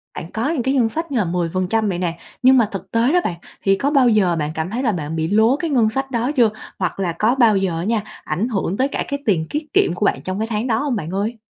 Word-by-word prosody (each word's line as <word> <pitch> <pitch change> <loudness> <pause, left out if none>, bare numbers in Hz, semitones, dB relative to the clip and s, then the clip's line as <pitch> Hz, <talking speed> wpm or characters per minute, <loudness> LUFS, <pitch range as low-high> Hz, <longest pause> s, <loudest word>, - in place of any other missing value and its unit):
bạn 170 - -7
có 230 +7 -1
những 305 -7 -1
cái 265 +2 +1
ngân 235 -4 +2
sách 325 +3 -4
như 260 - 0
là 210 - +2
10% 185 +5 0
vậy 175 -1 -2
nè, 170 -2 -2 0.3
nhưng 260 0 +7
mà 225 -4 +4
thực 195 -3 -7
tế 235 +5 +2
đó, 360 - +5
bạn, 170 - -2 0.3
thì 195 0 +4
có 275 +8 -1
bao 270 -5 +5
giờ 190 -6 +3
bạn 150 -1 -2
cảm 160 +2 -2
thấy 240 +6 -3
là 230 - +2
bạn 160 -4 -4
bị 160 0 -1
lố 220 +6 +4
cái 330 +2 -3
ngân 235 -6 +3
sách 270 +3 -3
đó 240 +3 0
chưa? 235 -4 +5 0.3
Hoặc 185 +1 -2
là 175 -3 -1
có 230 +5 +3
bao 225 -6 +4
giờ 185 -4 -1
á 165 - -3
nha, 220 +1 0 0.2
ảnh 175 +9 -1
hưởng 195 -3 -1
tới 265 - +2
cả - - -3
cái 280 - -3
tiền 165 -7 +1
kiết 300 +1 -2
kiệm 170 - +3
của 205 - -1
bạn - - +1
trong 185 +2 -3
cái 220 - -1
tháng 225 +2 -2
đó 220 -2 +1
hông, 280 -4 -1
bạn 160 -5 -4
ơi? 210 +4 -2
220 Hz, 295 wpm, -20 LUFS, 180-250 Hz, 0.3 s, nhưng